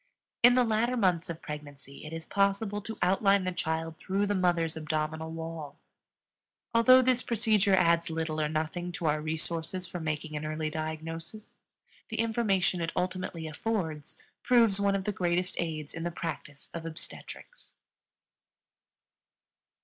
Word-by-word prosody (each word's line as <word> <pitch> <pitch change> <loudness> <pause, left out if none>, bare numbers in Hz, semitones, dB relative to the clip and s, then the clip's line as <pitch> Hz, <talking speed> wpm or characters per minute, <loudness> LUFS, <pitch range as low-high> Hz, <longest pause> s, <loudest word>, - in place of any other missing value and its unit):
In 245 +1 +8
the 250 - +5
latter 235 +2 +1
months 180 -6 +2
of 165 -1 -6
pregnancy 145 -2 -8
it 155 - -7
is 165 0 -6
possible 200 +1 +1
to 220 +2 -6
outline 195 +2 +4
the 185 - -1
child 160 -2 -2
through 195 +2 0
the 205 - 0
mother's 175 -4 +1
abdominal 155 0 -2
wall. 160 -3 -6 1.0
Although 255 +3 +7
this 255 -1 +3
procedure 215 -4 +3
adds 170 -2 +3
little 160 -1 -2
or 150 - +1
nothing 160 +3 -2
to 170 - -4
our 150 0 +2
resources 165 +3 -2
for 180 - -6
making 155 -1 -3
an 150 - -3
early 155 0 -2
diagnosis, 165 +6 -6 0.5
the - - -4
information 210 -6 +1
it 165 0 -1
ultimately 180 -2 -2
affords 160 -3 -3 0.2
proves 230 -5 +5
one 200 0 +2
of 195 - -1
the 210 - -1
greatest 180 -1 0
aids 155 -3 -4
in 165 - -5
the 170 - -1
practice 160 -4 -6
of 170 - -5
obstetrics. 165 - -10
170 Hz, 150 wpm, -30 LUFS, 160-200 Hz, 1.0 s, In